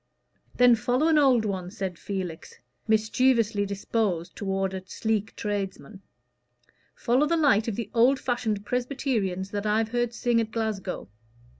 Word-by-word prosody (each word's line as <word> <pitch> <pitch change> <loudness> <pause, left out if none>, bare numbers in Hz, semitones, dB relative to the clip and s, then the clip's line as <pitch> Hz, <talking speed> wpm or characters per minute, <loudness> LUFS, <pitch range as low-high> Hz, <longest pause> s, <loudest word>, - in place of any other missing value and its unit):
"Then 245 -1 +6
follow 250 +7 +1
an 310 -2 +5
old 255 -6 +4
one," 185 -3 -3
said 190 -4 -5
Felix, 185 -5 -5 0.3
mischievously 220 -1 +2
disposed 200 -3 -2
toward 195 -2 -2
a 190 - -4
sleek 220 +1 -2
tradesman. 200 -1 -4 0.9
"Follow 260 +4 +2
the 335 - +1
light 265 -9 +3
of 225 - -2
the 235 - -5
old 250 +3 +4
fashioned 220 -5 -2
Presbyterians 240 -7 -2
that 205 +1 -2
I've 215 +1 +1
heard 240 0 -1
sing 240 -1 +2
at 225 - -3
Glasgow. 220 - -3
220 Hz, 140 wpm, -26 LUFS, 200-245 Hz, 0.9 s, Then